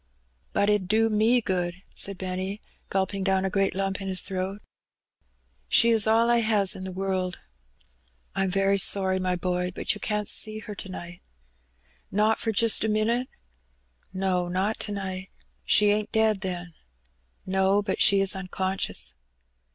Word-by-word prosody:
"But 200 Hz, -, +1 dB
it 210 Hz, -1 st, +3 dB
'ud 185 Hz, -, -9 dB
do 220 Hz, +3 st, +3 dB
me 225 Hz, +4 st, +3 dB
good," 180 Hz, -4 st, -2 dB, 0.2 s
said 195 Hz, -1 st, +1 dB
Benny, 185 Hz, +2 st, -4 dB, 0.3 s
gulping 195 Hz, 0 st, -1 dB
down 190 Hz, 0 st, +1 dB
a 190 Hz, -, -1 dB
great 195 Hz, -1 st, +1 dB
lump 195 Hz, 0 st, -2 dB
in 195 Hz, -, -5 dB
his 185 Hz, -1 st, +1 dB
throat. 190 Hz, +1 st, -4 dB, 0.6 s
" -, -, -43 dB
She 235 Hz, -, +5 dB
is 220 Hz, -2 st, +4 dB
all 225 Hz, +1 st, +4 dB
I 240 Hz, 0 st, +4 dB
has 215 Hz, -4 st, +3 dB
in 190 Hz, -, -8 dB
the 190 Hz, -, -5 dB
world." 185 Hz, -1 st, -2 dB, 0.5 s
" -, -, -40 dB
I'm 195 Hz, 0 st, 0 dB
very 195 Hz, +1 st, +1 dB
sorry, 190 Hz, -1 st, +3 dB
my 185 Hz, -1 st, 0 dB
boy, 180 Hz, 0 st, -1 dB
but -, -, 0 dB
you 210 Hz, -, -10 dB
can't 210 Hz, -1 st, -2 dB
see 215 Hz, 0 st, 0 dB
her 215 Hz, -1 st, -8 dB
to 195 Hz, -, -8 dB
night." 175 Hz, -1 st, -8 dB, 0.9 s
"Not 215 Hz, +2 st, +2 dB
for 225 Hz, -, -1 dB
jist 225 Hz, +1 st, +3 dB
a -, -, +1 dB
minit?" 230 Hz, +4 st, 0 dB, 0.8 s
"No, 185 Hz, -2 st, -1 dB
not 190 Hz, +5 st, -1 dB
to 210 Hz, -, -2 dB
night.*' 190 Hz, -2 st, -5 dB, 0.4 s
"She 210 Hz, 0 st, +5 dB
ain't 210 Hz, +1 st, -1 dB
dead, 220 Hz, -3 st, +2 dB
then?" 180 Hz, -2 st, -5 dB, 0.7 s
"No, 190 Hz, +2 st, +2 dB
but 195 Hz, -2 st, -2 dB
she 200 Hz, -1 st, +6 dB
is 195 Hz, -1 st, +2 dB
unconscious." 190 Hz, -, -1 dB
195 Hz, 170 wpm, -26 LUFS, 185-210 Hz, 0.9 s, she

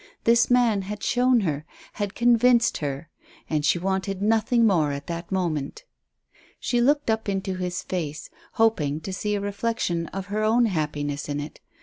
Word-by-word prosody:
This 230 Hz, +1 st, +4 dB
man 240 Hz, -5 st, +3 dB
had 205 Hz, +2 st, -6 dB
shown 250 Hz, -1 st, +3 dB
her, 155 Hz, -6 st, -2 dB, 0.3 s
had 205 Hz, -2 st, -4 dB
convinced 240 Hz, 0 st, +4 dB
her, 145 Hz, +2 st, -5 dB, 0.4 s
and 155 Hz, -2 st, -1 dB
she 155 Hz, -, +3 dB
wanted 190 Hz, +1 st, -2 dB
nothing 225 Hz, +3 st, +2 dB
more 165 Hz, -9 st, +3 dB
at 140 Hz, 0 st, -5 dB
that 170 Hz, +1 st, -6 dB
moment. 170 Hz, -, -2 dB, 0.8 s
She 240 Hz, -2 st, 0 dB
looked 285 Hz, -1 st, +2 dB
up 220 Hz, -1 st, -1 dB
into 195 Hz, -1 st, -2 dB
his 180 Hz, -1 st, -3 dB
face, 155 Hz, -5 st, -4 dB, 0.2 s
hoping 155 Hz, -11 st, +1 dB
to 190 Hz, +4 st, -6 dB
see 210 Hz, +2 st, -1 dB
a -, -, -1 dB
reflection 200 Hz, -4 st, -2 dB
of 190 Hz, +2 st, -6 dB
her 215 Hz, +1 st, 0 dB
own 230 Hz, +3 st, +4 dB
happiness 150 Hz, -6 st, -2 dB
in 145 Hz, 0 st, -2 dB
it. 145 Hz, +1 st, -7 dB
195 Hz, 165 wpm, -25 LUFS, 160-225 Hz, 0.8 s, This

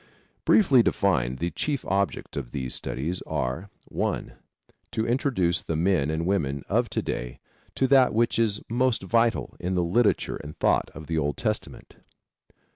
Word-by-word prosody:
Briefly 140 Hz, -, +6 dB
defined 65 Hz, -, +1 dB
the 85 Hz, +4 st, -2 dB
chief 145 Hz, -3 st, -2 dB
objects 100 Hz, 0 st, -1 dB
of 65 Hz, -4 st, -4 dB
these 65 Hz, -2 st, -3 dB
studies 75 Hz, +9 st, -2 dB
are: 65 Hz, +11 st, -2 dB, 0.2 s
(1) -, -, -2 dB, 0.6 s
To 110 Hz, -1 st, 0 dB
introduce 115 Hz, -, +1 dB
the 80 Hz, -, -3 dB
men 85 Hz, -3 st, +2 dB
and 80 Hz, +1 st, -1 dB
women 70 Hz, -8 st, 0 dB
of -, -, +1 dB
to -, -, -2 dB
day -, -, -4 dB, 0.4 s
to 135 Hz, -, +2 dB
that 130 Hz, -1 st, +5 dB
which 115 Hz, +1 st, +1 dB
is 105 Hz, -3 st, +1 dB
most 120 Hz, -2 st, +1 dB
vital 115 Hz, +4 st, +1 dB
in 90 Hz, +1 st, -2 dB
the 90 Hz, -, +2 dB
literature 105 Hz, +7 st, +1 dB
and 75 Hz, +1 st, -10 dB
thought -, -, +2 dB
of 80 Hz, -, -8 dB
the 80 Hz, +1 st, -1 dB
Old 75 Hz, -2 st, -1 dB
Testament. -, -, -4 dB
90 Hz, 160 wpm, -26 LUFS, 75-115 Hz, 0.6 s, Briefly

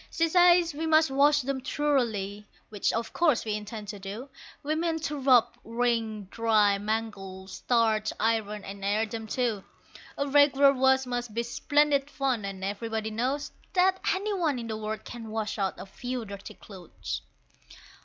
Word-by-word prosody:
She 330 Hz, 0 st, +1 dB
says 350 Hz, -1 st, +5 dB
we 320 Hz, +3 st, -3 dB
must 315 Hz, -2 st, +4 dB
wash 290 Hz, +2 st, +4 dB
them 270 Hz, 0 st, -2 dB
thoroughly, 225 Hz, -8 st, -1 dB, 0.2 s
which 205 Hz, -2 st, 0 dB
of 230 Hz, 0 st, -3 dB
course 310 Hz, -10 st, +2 dB
we 215 Hz, -, -1 dB
intend 210 Hz, 0 st, -6 dB
to 205 Hz, -1 st, -6 dB
do, 205 Hz, +8 st, -7 dB, 0.3 s
We 300 Hz, +2 st, 0 dB
mean 325 Hz, +1 st, 0 dB
to 295 Hz, -2 st, -3 dB
rub, 255 Hz, -3 st, +5 dB
wring, 230 Hz, -2 st, -1 dB
dry, 215 Hz, -3 st, +3 dB
mangle, 205 Hz, -3 st, -4 dB
starch, 220 Hz, +1 st, +1 dB
iron, 215 Hz, -2 st, 0 dB
and 195 Hz, 0 st, -8 dB
air 210 Hz, +3 st, +1 dB
them 225 Hz, 0 st, -6 dB
too. 225 Hz, -4 st, -1 dB, 0.5 s
A 280 Hz, -, -1 dB
regular 280 Hz, -1 st, +5 dB
wash 265 Hz, 0 st, +3 dB
must 245 Hz, -3 st, -4 dB
be 235 Hz, -, 0 dB
splendid 285 Hz, +3 st, +1 dB
fun, 265 Hz, -7 st, -1 dB
and 195 Hz, -1 st, -6 dB
everybody 220 Hz, +2 st, -3 dB
knows 260 Hz, +6 st, -2 dB, 0.2 s
That 375 Hz, 0 st, +3 dB, 0.2 s
any 410 Hz, +2 st, -2 dB
one 325 Hz, -8 st, 0 dB
in 235 Hz, -, -5 dB
the 220 Hz, -1 st, -4 dB
world 215 Hz, 0 st, -5 dB
can 230 Hz, -2 st, -8 dB
wash 215 Hz, -1 st, -3 dB
out 195 Hz, -1 st, 0 dB
a -, -, -7 dB
few 245 Hz, +4 st, -5 dB
dirty 200 Hz, +1 st, -9 dB
clothes. 185 Hz, -5 st, -7 dB
230 Hz, 165 wpm, -28 LUFS, 210-280 Hz, 0.5 s, says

